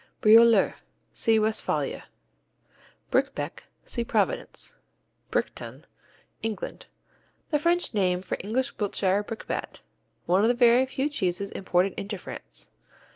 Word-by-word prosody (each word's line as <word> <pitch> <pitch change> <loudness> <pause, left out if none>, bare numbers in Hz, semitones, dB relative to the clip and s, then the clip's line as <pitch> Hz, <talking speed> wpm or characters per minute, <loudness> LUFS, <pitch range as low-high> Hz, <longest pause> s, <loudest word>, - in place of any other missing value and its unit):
Brioler 225 -1 +6 0.4
see 225 -1 +2
Westphalia. 220 0 0 1.1
Briquebec - - -1 0.2
see 235 - -3
Providence - - -1 0.6
Briqueton - - -3 0.6
England 220 -2 -5 0.6
The 295 - +3
French 345 0 +1
name 185 -3 +1
for - - -2
English 235 +7 -2
Wiltshire 200 -1 +1
Brickbat, 220 +2 -5 0.4
one 185 +3 +3
of 220 - +4
the 245 - +3
very 240 +1 +5
few 265 +2 -1
cheeses 200 -8 -2
imported 185 0 +1
into 205 +1 -4
France. - - -6
220 Hz, 110 wpm, -27 LUFS, 195-240 Hz, 1.1 s, Brioler